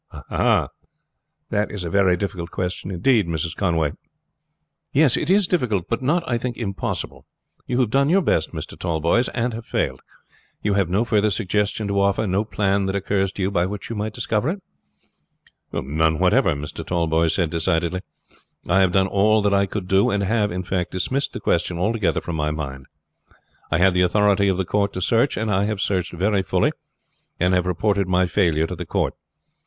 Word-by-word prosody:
"Ah! - - +2 0.8
that 105 +1 0
is 105 -3 -5
a 85 - -3
very 95 -3 +3
difficult 90 -3 -4
question 90 +1 -4
indeed, 100 +2 +2
Mrs. 80 -1 -2
Conway." 80 -6 +1 1.0
"Yes, 145 -3 +4
it 155 - -2
is 200 +1 +4
difficult, 120 - 0
but 115 - -2
not, 165 +5 0
I 120 -1 0
think, 125 0 -4
impossible. 100 -5 -4 0.4
You 125 - 0
have 115 -4 0
done 140 +2 +3
your 190 +3 +3
best, - - +1
Mr. - - -7
Tallboys, 85 +8 0
and 120 0 0
have 115 +1 -7
failed. - - -1 0.6
You 105 - +1
have 100 -3 +1
no 100 +6 +1
further 105 -2 +2
suggestion 105 +1 -1
to 100 0 +1
offer, 100 +2 +1
no 100 +1 +1
plan 100 -2 0
that 95 - -2
occurs 95 -1 0
to 100 - -3
you 95 - 0
by 90 -2 +1
which 105 +3 -6
you - - -3
might 105 0 -3
discover 110 +5 0
it?" 190 +2 -4 1.1
"None 80 +4 0
whatever," 95 - +3
Mr. 75 +1 -6
Tallboys 80 -2 +1
said 85 -4 0
decidedly. 85 +2 0 0.7
"I 95 - +3
have 95 -2 +3
done 95 -1 +4
all 105 +2 +3
that 100 -1 +2
I 100 0 +3
could 95 -1 -5
do; 95 +1 +3
and 100 0 0
have, 105 +1 +1
in 90 +1 -3
fact, 90 0 -2
dismissed 130 +9 -1
the - - -5
question 85 0 0
altogether 100 -2 0
from 85 - -5
my 75 -1 0
mind. 70 -4 -5 0.8
I 75 - +1
had 90 +1 +4
the 90 - +2
authority 100 +2 +3
of 95 -2 +1
the 95 - -1
court 100 +2 0
to - - -3
search, 115 +8 +2
and 110 0 -1
I 100 +1 +2
have 105 -1 -2
searched 95 -3 -1
very 95 +3 +1
fully, 95 - +1 0.7
and 90 +1 +2
have 90 0 +2
reported 100 +1 +1
my 90 0 +3
failure 85 -4 +1
to - - -5
the - - -7
court. - - 0
100 Hz, 195 wpm, -22 LUFS, 90-105 Hz, 1.1 s, Yes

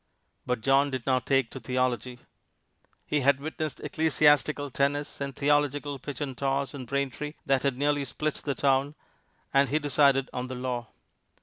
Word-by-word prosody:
But 125 -2 -1
John 135 +4 +3
did 130 -3 -4
not 130 -3 +1
take 135 -4 +2
to 135 - -7
theology. 125 0 -1 0.9
He 150 - 0
had 140 0 +3
witnessed 155 0 -4
ecclesiastical 150 -2 +2
tennis 140 +3 -1
and 140 -1 -3
theological 145 -1 +1
pitch 145 +1 -7
and 135 -3 -3
toss 135 +1 -1
in 135 -3 -7
Braintree 140 +3 -3
that 135 -1 +2
had 135 -3 0
nearly 145 0 +1
split 150 +3 -2
the 140 -2 -1
town, 140 +1 +1 0.6
and 140 -1 +4
he 150 - +2
decided 140 -2 +3
on 125 0 -3
the 130 - -6
law. 125 -2 -3
140 Hz, 165 wpm, -28 LUFS, 130-145 Hz, 0.9 s, and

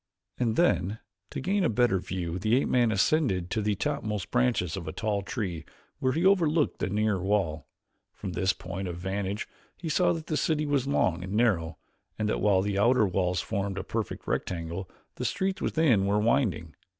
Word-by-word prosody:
And 115 -3 +1
then, 105 - +2 0.3
to - - -5
gain 195 +8 +1
a - - +3
better 115 -4 +2
view, 90 -1 -4
the 110 +5 +2
ape - - -1
man 120 -3 +3
ascended 100 - +1
to 110 - 0
the 105 0 +1
topmost 110 -5 -2
branches 120 -9 +1
of 95 -4 -6
a - - -2
tall 105 +2 -1
tree 100 - -4 0.4
where 130 0 +1
he 165 +4 0
overlooked 170 -6 +3
the - - -1
nearer 105 -1 +1
wall. 95 -6 0 0.4
From 95 - -6
this 95 +2 +1
point 95 +1 -5
of 85 -1 -5
vantage 95 +3 -3 0.3
he 165 - -5
saw 175 +4 +3
that 160 -2 -5
the 155 - -1
city 155 +1 +1
was 140 -3 0
long 90 - +1
and 95 +2 -5
narrow, 95 -8 +1 0.4
and 110 - 0
that - - -1
while 100 -3 +3
the 100 -1 -1
outer 120 +1 +4
walls 90 -1 0
formed 100 -2 -3
a 95 - -2
perfect 110 +2 -4
rectangle, 85 +1 -3 0.3
the - - -4
streets 190 0 -1
within 125 -12 +3
were 100 +1 +2
winding. 105 - +1
105 Hz, 190 wpm, -28 LUFS, 95-130 Hz, 0.4 s, outer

